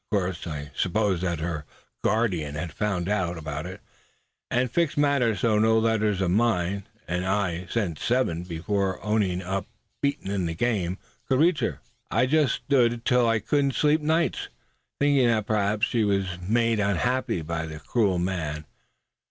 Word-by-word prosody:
Of 105 Hz, -, +3 dB
course 90 Hz, -2 st, -3 dB
I 75 Hz, -2 st, -5 dB
supposed 95 Hz, -1 st, +1 dB
that 85 Hz, -4 st, -1 dB
her 80 Hz, -2 st, -3 dB, 0.4 s
guardian 90 Hz, -10 st, 0 dB
had 80 Hz, 0 st, -4 dB
found 95 Hz, -2 st, -1 dB
out 90 Hz, -4 st, 0 dB
about 75 Hz, +1 st, -5 dB
it, 90 Hz, 0 st, -9 dB, 0.7 s
and 125 Hz, 0 st, +1 dB
fixed 165 Hz, 0 st, +1 dB
matters 140 Hz, -8 st, +2 dB
so 110 Hz, -3 st, +3 dB
no 110 Hz, +1 st, +4 dB
letter 110 Hz, -1 st, +2 dB
of 95 Hz, -3 st, 0 dB
mine 100 Hz, -3 st, +1 dB, 0.2 s
and 90 Hz, +1 st, -1 dB
I 95 Hz, -2 st, -1 dB
sent 95 Hz, -9 st, -1 dB
seven 120 Hz, -9 st, +1 dB
before 95 Hz, +3 st, -2 dB
owning 100 Hz, -4 st, +1 dB
up 95 Hz, +1 st, -3 dB, 0.3 s
beaten 140 Hz, -8 st, -1 dB
in 95 Hz, -4 st, 0 dB
the 80 Hz, -, -3 dB
game 95 Hz, -3 st, 0 dB, 0.3 s
could 130 Hz, -1 st, +3 dB
reach 165 Hz, +1 st, +4 dB
her. -, -, -2 dB, 0.3 s
"I -, -, +3 dB
just 145 Hz, -2 st, +3 dB
stood 125 Hz, -4 st, +2 dB
it 120 Hz, 0 st, -9 dB
till 125 Hz, -2 st, +4 dB
I 115 Hz, -, +3 dB
couldn't 140 Hz, +5 st, +1 dB
sleep 150 Hz, +1 st, +3 dB
nights, 160 Hz, +3 st, +1 dB, 0.5 s
thinking 140 Hz, -3 st, +4 dB
that 110 Hz, -3 st, +2 dB
perhaps 105 Hz, 0 st, +1 dB
she 115 Hz, -2 st, 0 dB
was 100 Hz, -2 st, +1 dB
being 90 Hz, +2 st, -6 dB
made 115 Hz, -1 st, +3 dB
unhappy 115 Hz, 0 st, 0 dB
by 80 Hz, 0 st, -3 dB
that 75 Hz, -1 st, -9 dB
cruel 105 Hz, -6 st, +2 dB
man. 80 Hz, -4 st, -2 dB
100 Hz, 170 wpm, -26 LUFS, 90-120 Hz, 0.7 s, no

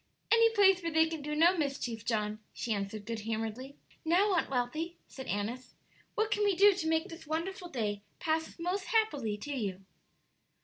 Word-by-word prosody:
"Any 460 Hz, 0 st, +6 dB
place 385 Hz, -3 st, +6 dB
where 335 Hz, -1 st, -2 dB
they 320 Hz, 0 st, +5 dB
can 320 Hz, -1 st, -4 dB
do 300 Hz, +1 st, -3 dB
no 340 Hz, +4 st, +5 dB
mischief, 275 Hz, -, -2 dB
John," 215 Hz, -2 st, -1 dB
she 230 Hz, -, -2 dB
answered, 205 Hz, +1 st, -4 dB
good 230 Hz, -1 st, -3 dB
humoredly. 225 Hz, +5 st, -4 dB, 0.3 s
"Now, 370 Hz, +5 st, +3 dB
Aunt 345 Hz, -, +1 dB
Wealthy," 310 Hz, +7 st, -2 dB
said 265 Hz, -, -9 dB
Annis, 225 Hz, +6 st, -3 dB, 0.4 s
"what 435 Hz, +1 st, +1 dB
can 420 Hz, -, +2 dB
we 405 Hz, -2 st, +3 dB
do 400 Hz, +3 st, +7 dB
to 350 Hz, -4 st, -3 dB
make 320 Hz, +4 st, +1 dB
this 330 Hz, -1 st, -10 dB
wonderful 350 Hz, +3 st, -3 dB
day 210 Hz, -7 st, -2 dB, 0.2 s
pass 320 Hz, 0 st, -1 dB
most 360 Hz, +3 st, -2 dB
happily 290 Hz, -, +1 dB
to 285 Hz, +6 st, -5 dB
you?" 195 Hz, -6 st, -3 dB
310 Hz, 180 wpm, -32 LUFS, 225-355 Hz, 0.4 s, do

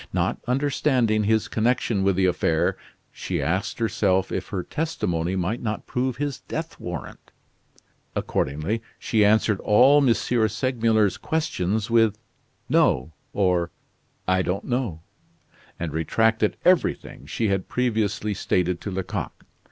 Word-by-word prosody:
Not -, -, 0 dB
understanding 125 Hz, -5 st, +1 dB
his 110 Hz, 0 st, +2 dB
connection 115 Hz, -2 st, +1 dB
with 95 Hz, -1 st, +2 dB
the 95 Hz, 0 st, +2 dB
affair, 85 Hz, -3 st, +1 dB, 0.4 s
she -, -, -4 dB
asked 95 Hz, +5 st, -1 dB
herself 95 Hz, -4 st, +1 dB
if -, -, -3 dB
her 95 Hz, -3 st, -3 dB
testimony 90 Hz, -, -2 dB
might 95 Hz, +6 st, -1 dB
not 110 Hz, -3 st, -3 dB
prove 125 Hz, 0 st, -2 dB
his 145 Hz, -1 st, -3 dB
death 160 Hz, +1 st, -6 dB
warrant. 90 Hz, -5 st, -7 dB, 0.9 s
Accordingly, 75 Hz, +12 st, -1 dB, 0.2 s
she 110 Hz, -2 st, +1 dB
answered 105 Hz, -1 st, +3 dB
all 130 Hz, +7 st, +5 dB
M. 130 Hz, -, +4 dB
Segmuller's 115 Hz, -2 st, +1 dB
questions 110 Hz, -, -1 dB
with 115 Hz, -3 st, +4 dB, 0.5 s
"no" 65 Hz, +5 st, +2 dB, 0.2 s
or 90 Hz, -3 st, +1 dB, 0.6 s
"I 95 Hz, 0 st, +3 dB
don't 95 Hz, +1 st, -2 dB
know"; 120 Hz, -11 st, -2 dB, 0.8 s
and 85 Hz, -3 st, -3 dB
retracted 110 Hz, +7 st, +1 dB
everything 180 Hz, 0 st, +1 dB
she 110 Hz, -3 st, -1 dB
had 95 Hz, -1 st, -1 dB
previously 110 Hz, -4 st, 0 dB
stated 90 Hz, -2 st, 0 dB
to -, -, -4 dB
Lecoq. 95 Hz, -1 st, -5 dB
105 Hz, 125 wpm, -24 LUFS, 95-120 Hz, 0.9 s, all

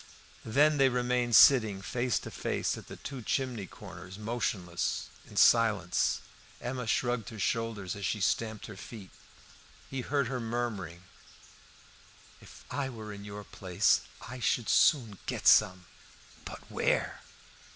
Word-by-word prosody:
Then 145 Hz, +6 st, +3 dB
they 135 Hz, -1 st, +6 dB
remained 125 Hz, -1 st, +1 dB
sitting 110 Hz, -8 st, +7 dB
face 125 Hz, +2 st, 0 dB
to -, -, -7 dB
face -, -, -2 dB
at -, -, -11 dB
the -, -, -9 dB
two 135 Hz, -2 st, -7 dB
chimney 120 Hz, -4 st, -2 dB
corners, 95 Hz, +3 st, -11 dB
motionless, 105 Hz, -6 st, -2 dB, 0.2 s
in -, -, -11 dB
silence. 105 Hz, -6 st, +3 dB, 0.4 s
Emma 125 Hz, -1 st, -4 dB
shrugged 120 Hz, -1 st, 0 dB
her 110 Hz, -, -9 dB
shoulders 110 Hz, -3 st, -2 dB
as 100 Hz, -, -8 dB
she 105 Hz, -, -1 dB
stamped 110 Hz, +2 st, -1 dB
her 105 Hz, -, -9 dB
feet. 100 Hz, -1 st, -10 dB, 0.8 s
He 135 Hz, -1 st, -3 dB
heard 140 Hz, 0 st, 0 dB
her 130 Hz, 0 st, -3 dB
murmuring 110 Hz, -7 st, -4 dB, 1.4 s
"If -, -, -15 dB
I 135 Hz, 0 st, -2 dB
were 110 Hz, -4 st, -8 dB
in 100 Hz, 0 st, -9 dB
your 105 Hz, 0 st, -7 dB
place 90 Hz, -2 st, +1 dB, 0.3 s
I 125 Hz, +1 st, -7 dB
should 120 Hz, -1 st, 0 dB
soon 115 Hz, -, +3 dB
get -, -, -4 dB
some." 90 Hz, -4 st, +5 dB, 0.6 s
"But -, -, -8 dB
where?" -, -, 0 dB
115 Hz, 140 wpm, -30 LUFS, 100-125 Hz, 1.4 s, sitting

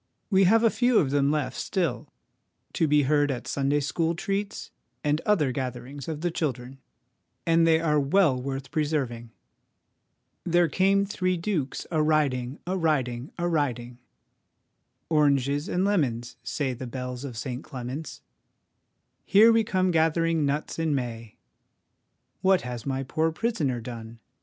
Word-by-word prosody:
We 190 Hz, 0 st, +5 dB
have 225 Hz, +5 st, +4 dB
a 230 Hz, -, +5 dB
few 245 Hz, -1 st, +2 dB
of 135 Hz, -5 st, +2 dB
them 140 Hz, 0 st, +2 dB
left 145 Hz, -4 st, -1 dB
still 170 Hz, -, -2 dB, 0.6 s
to 160 Hz, -, +1 dB
be 150 Hz, 0 st, +4 dB
heard 145 Hz, +1 st, +2 dB
at 125 Hz, -3 st, -4 dB
Sunday 140 Hz, +1 st, +1 dB
school 165 Hz, +3 st, -1 dB
treats 200 Hz, +3 st, -3 dB, 0.3 s
and 150 Hz, +1 st, +1 dB
other 160 Hz, -11 st, +3 dB
gatherings 130 Hz, +1 st, -5 dB
of 155 Hz, -2 st, -4 dB
the 175 Hz, 0 st, 0 dB
children, 135 Hz, -5 st, -3 dB, 0.7 s
and 165 Hz, 0 st, +4 dB
they 160 Hz, -1 st, +4 dB
are 150 Hz, -2 st, +2 dB
well 140 Hz, -2 st, +3 dB
worth 135 Hz, +1 st, -5 dB
preserving 135 Hz, -7 st, -2 dB, 1.1 s
'There 175 Hz, -1 st, +3 dB
came 195 Hz, +1 st, +3 dB
three 185 Hz, -2 st, -1 dB
dukes 165 Hz, -6 st, -2 dB
a 160 Hz, -2 st, +2 dB
riding, 140 Hz, -4 st, +1 dB
a 185 Hz, +2 st, -1 dB
riding, 135 Hz, -7 st, -1 dB
a 175 Hz, 0 st, -1 dB
riding' 125 Hz, -7 st, -2 dB, 0.6 s
' -, -, -50 dB
Oranges 145 Hz, 0 st, +2 dB
and 180 Hz, +2 st, +1 dB
lemons, 125 Hz, -, 0 dB
say 130 Hz, +2 st, -2 dB
the 125 Hz, +1 st, -7 dB
bells 125 Hz, +1 st, -5 dB
of 130 Hz, -5 st, -6 dB
St 125 Hz, +3 st, -5 dB
Clement's 130 Hz, +3 st, -7 dB, 0.3 s
' -, -, -50 dB
' -, -, -50 dB, 0.3 s
Here 220 Hz, +4 st, +6 dB
we 225 Hz, 0 st, +4 dB
come 185 Hz, -4 st, +1 dB
gathering 165 Hz, -1 st, +2 dB
nuts 150 Hz, +3 st, -2 dB
in 160 Hz, -3 st, +1 dB
May 115 Hz, -4 st, -5 dB, 0.3 s
'; -, -, -50 dB
* -, -, -49 dB
What 190 Hz, -1 st, +4 dB
has 125 Hz, 0 st, -6 dB
my 135 Hz, 0 st, -1 dB
poor 160 Hz, +5 st, 0 dB
prisoner 160 Hz, -, -1 dB
done 115 Hz, -1 st, -8 dB
150 Hz, 155 wpm, -26 LUFS, 130-170 Hz, 1.1 s, Here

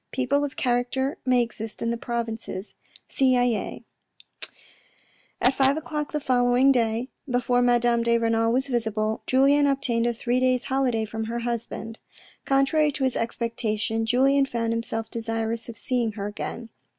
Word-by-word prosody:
People 275 Hz, +2 st, +1 dB
of 275 Hz, -2 st, -4 dB
character 255 Hz, +3 st, 0 dB
may 250 Hz, -1 st, +4 dB
exist 225 Hz, -2 st, -7 dB
in 230 Hz, -, -1 dB
the -, -, 0 dB
provinces. 230 Hz, -4 st, -4 dB, 0.2 s
— -, -, -25 dB
SiZyes 245 Hz, -4 st, +1 dB, 1.6 s
At 250 Hz, -, +4 dB
five 270 Hz, +2 st, +3 dB
o'clock 300 Hz, -1 st, -4 dB
the 300 Hz, -, -1 dB
following 250 Hz, 0 st, +3 dB
day, 235 Hz, 0 st, 0 dB, 0.2 s
before 245 Hz, 0 st, +2 dB
Madame 240 Hz, -1 st, +3 dB
de 235 Hz, 0 st, +3 dB
Renal 225 Hz, 0 st, +1 dB
was 265 Hz, +3 st, +1 dB
visible, 220 Hz, -3 st, -1 dB
Julien 280 Hz, +2 st, +4 dB
obtained 260 Hz, -4 st, +1 dB
a 240 Hz, -, +1 dB
three 245 Hz, +2 st, 0 dB
days' 255 Hz, -1 st, +2 dB
holiday 255 Hz, -5 st, 0 dB
from 220 Hz, +1 st, -4 dB
her 235 Hz, +1 st, -3 dB
husband. 230 Hz, -1 st, -4 dB, 0.5 s
Contrary 280 Hz, +3 st, +3 dB
to 275 Hz, -, -2 dB
his 260 Hz, -1 st, +1 dB
expectation 225 Hz, -1 st, -1 dB
Julien 270 Hz, +3 st, +3 dB
found 230 Hz, -2 st, -1 dB
himself 225 Hz, -1 st, -3 dB
desirous 225 Hz, 0 st, -2 dB
of 225 Hz, -, -8 dB
seeing 245 Hz, -5 st, -1 dB
her 200 Hz, -1 st, -5 dB
again. 225 Hz, +3 st, -6 dB
240 Hz, 150 wpm, -25 LUFS, 225-265 Hz, 1.6 s, may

